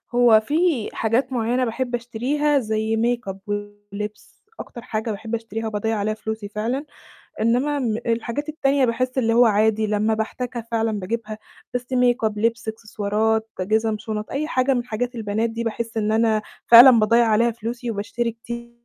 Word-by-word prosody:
هو 240 Hz, -3 st, +6 dB
في 295 Hz, 0 st, 0 dB
حاجات 240 Hz, +4 st, 0 dB
معيّنة 245 Hz, +2 st, +1 dB
باحب 245 Hz, +1 st, -2 dB
أشتريها 275 Hz, +5 st, 0 dB
زي 220 Hz, -1 st, -1 dB
makeup 235 Hz, -4 st, -1 dB
ولِبس، 205 Hz, 0 st, -7 dB, 0.2 s
أكتر 235 Hz, -, -8 dB
حاجة 220 Hz, -1 st, -3 dB
باحب 220 Hz, +2 st, -4 dB
أشتريها 225 Hz, 0 st, -5 dB
وباضيّع 220 Hz, +1 st, -1 dB
عليها 210 Hz, +1 st, -1 dB
فلوسي 220 Hz, -1 st, -5 dB
فعلًا. 230 Hz, +7 st, -2 dB, 0.6 s
إنمّا 250 Hz, +6 st, +1 dB, 0.3 s
الحاجات 235 Hz, +5 st, -2 dB
التانية 280 Hz, -3 st, +1 dB
باحس 255 Hz, +2 st, -1 dB
اللي 230 Hz, -3 st, +2 dB
هو 240 Hz, +1 st, +6 dB
عادي 220 Hz, 0 st, +2 dB
لمّا 215 Hz, +1 st, +1 dB
باحتاجها 235 Hz, +2 st, -4 dB
فعلًا 225 Hz, -2 st, 0 dB
باجيبها، 215 Hz, +2 st, -4 dB, 0.4 s
بس 245 Hz, -, 0 dB
makeup، 245 Hz, -3 st, +2 dB
لِبس، 225 Hz, +1 st, -1 dB
إكسسوارات، 220 Hz, 0 st, -1 dB
جِزم، 220 Hz, +3 st, +1 dB
شُنط، 210 Hz, 0 st, -5 dB
أي 290 Hz, +3 st, -2 dB
حاجة 260 Hz, -2 st, +2 dB
من 245 Hz, -1 st, -1 dB
حاجات 245 Hz, +1 st, -3 dB
البنات 220 Hz, 0 st, -1 dB
دي 230 Hz, +1 st, -4 dB
باحس 230 Hz, 0 st, -4 dB
إن 215 Hz, -1 st, 0 dB
أنا 220 Hz, -1 st, +2 dB, 0.2 s
فعلًا 240 Hz, +3 st, +10 dB
باضيّع 230 Hz, +2 st, +4 dB
عليها 225 Hz, +2 st, +3 dB
فلوسي 235 Hz, +1 st, -5 dB
وباشتري 230 Hz, +3 st, -2 dB
كتير 235 Hz, +1 st, -8 dB
225 Hz, 155 wpm, -22 LUFS, 215-245 Hz, 0.6 s, فعلًا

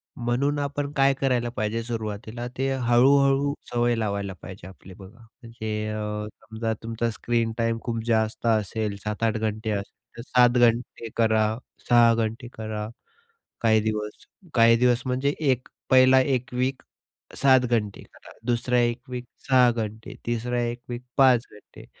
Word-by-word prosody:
म्हणून 130 Hz, +5 st, 0 dB
आपण 145 Hz, 0 st, -3 dB
काय 135 Hz, -1 st, +4 dB
करायला 125 Hz, -3 st, +1 dB
पाहिजे 110 Hz, +2 st, -1 dB
सुरुवातीला 115 Hz, +1 st, -5 dB
ते 135 Hz, +1 st, 0 dB
हळू-हळू 135 Hz, +3 st, +3 dB, 0.2 s
सवय 120 Hz, 0 st, +2 dB
लावायला 100 Hz, -3 st, -2 dB
पाहिजे 95 Hz, -1 st, -10 dB
आपली 95 Hz, 0 st, -13 dB
बघा, 100 Hz, +4 st, -14 dB
म्हणजे 110 Hz, -2 st, -6 dB
अ, 105 Hz, 0 st, -3 dB
समजा, 110 Hz, 0 st, -4 dB
तुमचा 115 Hz, +1 st, -2 dB
स्क्रीन 115 Hz, 0 st, -1 dB
टाईम 115 Hz, 0 st, 0 dB
खूप 115 Hz, -2 st, -2 dB
जास्त 110 Hz, 0 st, 0 dB
असेल, 110 Hz, -1 st, 0 dB
7-8 110 Hz, +1 st, -1 dB
घंटे 110 Hz, 0 st, -2 dB
असेल, 100 Hz, 0 st, -4 dB, 0.2 s
तर -, -, -6 dB
7 125 Hz, -1 st, +5 dB
घंटे 115 Hz, -1 st, +1 dB
करा, 110 Hz, -1 st, +3 dB, 0.4 s
6 120 Hz, -1 st, +6 dB
घंटे 115 Hz, +2 st, -2 dB
करा 110 Hz, -1 st, -5 dB, 0.7 s
काही 110 Hz, -1 st, +4 dB
दिवस, 105 Hz, -1 st, -4 dB, 0.3 s
काही 115 Hz, -1 st, +6 dB
दिवस 125 Hz, 0 st, +3 dB
म्हणजे 130 Hz, +3 st, 0 dB
1 130 Hz, -5 st, 0 dB, 0.2 s
पहिला 130 Hz, 0 st, +6 dB
1 130 Hz, -2 st, -1 dB
वीक 130 Hz, +2 st, -1 dB, 0.6 s
7 130 Hz, -2 st, +5 dB
घंटे 110 Hz, -5 st, -1 dB
करा, -, -, -16 dB
दुसरा 125 Hz, +1 st, +1 dB
1 120 Hz, 0 st, +1 dB
वीक 125 Hz, -1 st, -5 dB, 0.2 s
6 130 Hz, -2 st, +5 dB
घंटे, 110 Hz, -1 st, -5 dB
तिसरा 120 Hz, +1 st, -1 dB
1 120 Hz, +1 st, -3 dB
वीक 120 Hz, 0 st, -5 dB
5 130 Hz, -4 st, +5 dB
घंटे, 105 Hz, -, -15 dB
115 Hz, 145 wpm, -25 LUFS, 110-125 Hz, 0.7 s, 6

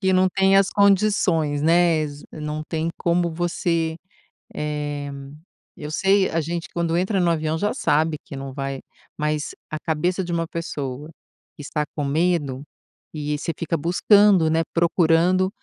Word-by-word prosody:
que 190 Hz, -1 st, +2 dB
não 185 Hz, 0 st, +4 dB
tem 195 Hz, +1 st, +3 dB
as 195 Hz, 0 st, +4 dB
condições, 190 Hz, -7 st, +2 dB
né, 170 Hz, 0 st, +4 dB
exa 145 Hz, -1 st, -5 dB
não 150 Hz, 0 st, -4 dB
tem 165 Hz, 0 st, -1 dB
como 170 Hz, 0 st, +1 dB
você 165 Hz, -1 st, -1 dB, 0.6 s
eh, 145 Hz, -1 st, -3 dB, 0.7 s
eu 150 Hz, -, -6 dB
sei, 195 Hz, +3 st, +3 dB
a 165 Hz, 0 st, 0 dB
gente 170 Hz, +3 st, -4 dB
quando 170 Hz, 0 st, 0 dB
entra 190 Hz, +2 st, 0 dB
no 175 Hz, -1 st, +2 dB
avião 155 Hz, 0 st, -1 dB
já 205 Hz, +5 st, 0 dB
sabe 155 Hz, -, +1 dB
que 140 Hz, -, -9 dB
não 135 Hz, -1 st, -6 dB
vai 135 Hz, -1 st, -4 dB, 0.4 s
mas 150 Hz, 0 st, -2 dB, 0.2 s
a 155 Hz, -, -3 dB
cabeça 175 Hz, +4 st, -1 dB
de 175 Hz, -, -5 dB
uma 165 Hz, -1 st, -1 dB
pessoa 150 Hz, -4 st, -5 dB, 0.5 s
que -, -, -10 dB
está 150 Hz, +1 st, -2 dB
com 150 Hz, -, -2 dB
medo, 145 Hz, -3 st, 0 dB, 0.5 s
e 150 Hz, -1 st, -2 dB
você 155 Hz, -, -3 dB
fica 165 Hz, 0 st, -1 dB
buscando, 180 Hz, +2 st, +4 dB
né, 160 Hz, +1 st, +2 dB
procurando 170 Hz, +2 st, +3 dB
165 Hz, 155 wpm, -22 LUFS, 150-180 Hz, 0.7 s, não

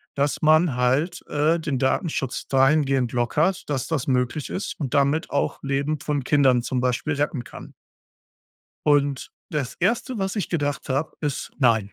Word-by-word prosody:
dass 140 Hz, +1 st, 0 dB
man 155 Hz, -2 st, +4 dB
halt, 140 Hz, +8 st, 0 dB
äh, 155 Hz, +3 st, +1 dB
den 145 Hz, -5 st, -2 dB
Datenschutz 135 Hz, -1 st, -1 dB
dahingehend 135 Hz, -2 st, +3 dB
lockert, 150 Hz, +10 st, +1 dB
dass 135 Hz, -4 st, -1 dB
das 155 Hz, -3 st, -2 dB
möglich 130 Hz, +3 st, 0 dB
ist 195 Hz, -, -4 dB
und 140 Hz, -2 st, -3 dB
damit 140 Hz, +3 st, +2 dB
auch 140 Hz, -, -1 dB
Leben 140 Hz, +2 st, -1 dB
von 145 Hz, -3 st, -2 dB
Kindern 130 Hz, -3 st, +3 dB
zum 125 Hz, +1 st, -2 dB
Beispiel 130 Hz, +5 st, 0 dB
retten 140 Hz, -3 st, -1 dB
kann. -, -, -11 dB, 1.1 s
Und, 145 Hz, -2 st, +2 dB, 0.2 s
das 145 Hz, -5 st, -2 dB
1., 235 Hz, +6 st, 0 dB
was 195 Hz, +1 st, -2 dB
ich 200 Hz, -, -2 dB
gedacht 145 Hz, -5 st, -2 dB
habe, 135 Hz, +4 st, -1 dB
ist: 145 Hz, -2 st, -3 dB
„Nein.“ 110 Hz, -6 st, +2 dB
145 Hz, 155 wpm, -24 LUFS, 130-155 Hz, 1.1 s, man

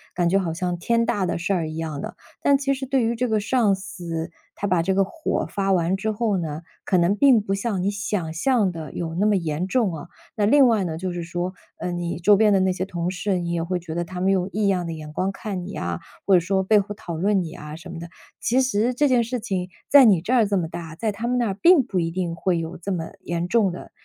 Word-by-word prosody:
感 175 Hz, -1 st, +2 dB
觉 195 Hz, +3 st, +3 dB
好 165 Hz, -4 st, -2 dB
像 180 Hz, +1 st, -1 dB
天 230 Hz, +5 st, +1 dB
大 205 Hz, -5 st, 0 dB
的 -, -, -1 dB
事 175 Hz, +3 st, -1 dB
儿 165 Hz, -4 st, -1 dB
一 155 Hz, -, -7 dB
样 155 Hz, -3 st, -4 dB
的， -, -, -6 dB, 0.3 s
但 280 Hz, -1 st, +4 dB
其 275 Hz, 0 st, 0 dB
实 265 Hz, 0 st, -5 dB
对 265 Hz, -2 st, +2 dB
于 230 Hz, +1 st, 0 dB
这 250 Hz, +2 st, 0 dB
个 220 Hz, -2 st, +1 dB
上 220 Hz, -2 st, +2 dB
司， 175 Hz, -4 st, -6 dB, 0.2 s
他 -, -, -4 dB
把 180 Hz, -3 st, +2 dB
这 190 Hz, +2 st, 0 dB
个 195 Hz, -, +4 dB
火 310 Hz, -, -2 dB
发 195 Hz, -1 st, -1 dB
完 180 Hz, 0 st, +2 dB
之 215 Hz, +3 st, -1 dB
后 215 Hz, -2 st, 0 dB
呢， 160 Hz, -2 st, -4 dB, 0.2 s
可 185 Hz, -, +1 dB
能 175 Hz, +3 st, +3 dB
并 250 Hz, +2 st, +5 dB
不 195 Hz, -1 st, -2 dB
像 195 Hz, -2 st, -1 dB
你 200 Hz, -, +1 dB
想 200 Hz, -5 st, -3 dB
象 210 Hz, +2 st, +2 dB
的 160 Hz, -4 st, -7 dB
有 165 Hz, -2 st, -4 dB
那 195 Hz, +5 st, +1 dB
么 210 Hz, -, +3 dB
严 170 Hz, 0 st, -1 dB
重 215 Hz, -4 st, +1 dB
啊。 165 Hz, -, -8 dB, 0.3 s
那 205 Hz, -1 st, +2 dB
另 280 Hz, +4 st, +6 dB
外 220 Hz, -4 st, +2 dB
呢， 160 Hz, -3 st, -3 dB
就 180 Hz, +1 st, -3 dB
是 175 Hz, -1 st, -4 dB
说， 175 Hz, +2 st, -3 dB, 0.2 s
嗯， 175 Hz, -1 st, -3 dB
你 170 Hz, 0 st, -3 dB
周 205 Hz, +4 st, +5 dB
边 210 Hz, +1 st, +4 dB
的 195 Hz, -, +4 dB
那 185 Hz, -1 st, +2 dB
些 185 Hz, +1 st, -3 dB
同 175 Hz, -2 st, -3 dB
事， 185 Hz, 0 st, -1 dB
也 170 Hz, -1 st, -2 dB
会 180 Hz, +2 st, -1 dB
觉 165 Hz, -2 st, -7 dB
得 175 Hz, +1 st, -1 dB
他 180 Hz, +1 st, -7 dB
们 190 Hz, +2 st, +2 dB
用 185 Hz, -1 st, +1 dB
异 210 Hz, 0 st, 0 dB
样 185 Hz, -3 st, +1 dB
的 165 Hz, -, -4 dB
眼 155 Hz, -1 st, -8 dB
光 190 Hz, +4 st, -1 dB
看 195 Hz, -3 st, -5 dB
你 195 Hz, -, -7 dB
呀， 85 Hz, -, -3 dB, 0.3 s
或 195 Hz, -, +5 dB
者 -, -, +6 dB
说 190 Hz, +2 st, 0 dB
背 210 Hz, +2 st, +4 dB
后 205 Hz, +1 st, -4 dB
讨 170 Hz, -5 st, -6 dB
论 195 Hz, +3 st, +2 dB
你 170 Hz, -, -4 dB
呀 150 Hz, -2 st, -8 dB
什 170 Hz, +3 st, -11 dB
么 175 Hz, -, -7 dB
的。 170 Hz, -, -7 dB, 0.3 s
其 255 Hz, +3 st, +2 dB
实 245 Hz, -1 st, +1 dB
这 290 Hz, +4 st, +2 dB
件 250 Hz, -3 st, +3 dB
事 245 Hz, +2 st, -3 dB
情 185 Hz, -4 st, -3 dB, 0.2 s
在 280 Hz, -2 st, +8 dB
你 195 Hz, -7 st, +5 dB
这 220 Hz, -, -4 dB
儿 235 Hz, -4 st, +5 dB
这 200 Hz, 0 st, 0 dB
么 170 Hz, -3 st, -1 dB
大， 165 Hz, -1 st, -7 dB
在 220 Hz, +4 st, -1 dB
他 225 Hz, +4 st, -4 dB
们 250 Hz, +1 st, +1 dB
那 240 Hz, -, +1 dB
儿 195 Hz, -, -1 dB
并 340 Hz, -, +6 dB
不 190 Hz, -5 st, -2 dB
一 165 Hz, -1 st, -1 dB
定 175 Hz, -1 st, -2 dB
会 175 Hz, 0 st, 0 dB
有 165 Hz, +2 st, -5 dB
这 195 Hz, +4 st, -5 dB
么 165 Hz, -3 st, -3 dB
严 170 Hz, 0 st, -2 dB
重 210 Hz, -2 st, +2 dB
的 175 Hz, -, -9 dB
190 Hz, 295 characters per minute, -23 LUFS, 170-215 Hz, 0.3 s, 在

